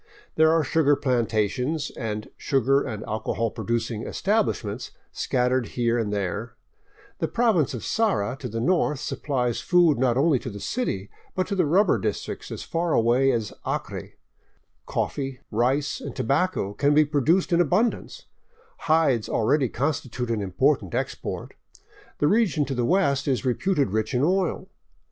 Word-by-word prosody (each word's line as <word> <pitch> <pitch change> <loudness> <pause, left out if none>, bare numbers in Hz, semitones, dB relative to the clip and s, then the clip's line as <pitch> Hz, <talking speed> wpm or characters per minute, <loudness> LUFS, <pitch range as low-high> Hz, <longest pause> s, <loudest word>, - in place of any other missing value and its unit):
There 160 0 +4
are 165 -1 +3
sugar 145 0 +3
plantations 125 +3 0
and 105 -1 -5
sugar 135 +1 +2
and 110 -5 -5
alcohol 110 +1 -2
producing 115 0 -2
establishments 130 - -1 0.2
scattered 125 -1 0
here 120 0 +2
and 105 -3 -1
there; 105 +3 -3 0.6
the - - 0
province 215 - +2
of 120 - -6
Sara 190 - 0
to 125 - -5
the 115 +1 -3
north 150 +1 +1
supplies 125 -5 -2
food 175 -7 +4
not 125 -2 +2
only 140 -1 +3
to 125 - -6
the 100 -2 -8
city 100 - -3 0.2
but 185 - +1
to 200 - -1
the 180 -5 +2
rubber 190 +5 +3
districts 105 -2 -4
as - - -6
far 170 0 -1
away 120 +4 +3
as 115 -5 -1
the - - -4
Acre; - - -7 0.7
coffee, 135 -2 -3
rice, 130 +6 0
and 140 - -7
tobacco 140 - 0
can 145 +6 +2
be 155 0 +6
produced 155 +5 +2
in 170 - +5
abundance; 185 +8 0 0.6
hides 155 -8 +3
already 130 +3 +2
constitute 130 -3 -2
an 110 -2 -1
important 95 -2 +1
export; - - -4 0.6
the 145 - +2
region 195 -7 +2
to 135 - -3
the 120 -2 0
west 140 -5 +2
is 135 0 0
re 125 - +3
puted 150 - 0
rich 110 +2 -1
in 125 - +2
oil. 185 +2 0
135 Hz, 155 wpm, -25 LUFS, 115-160 Hz, 0.7 s, be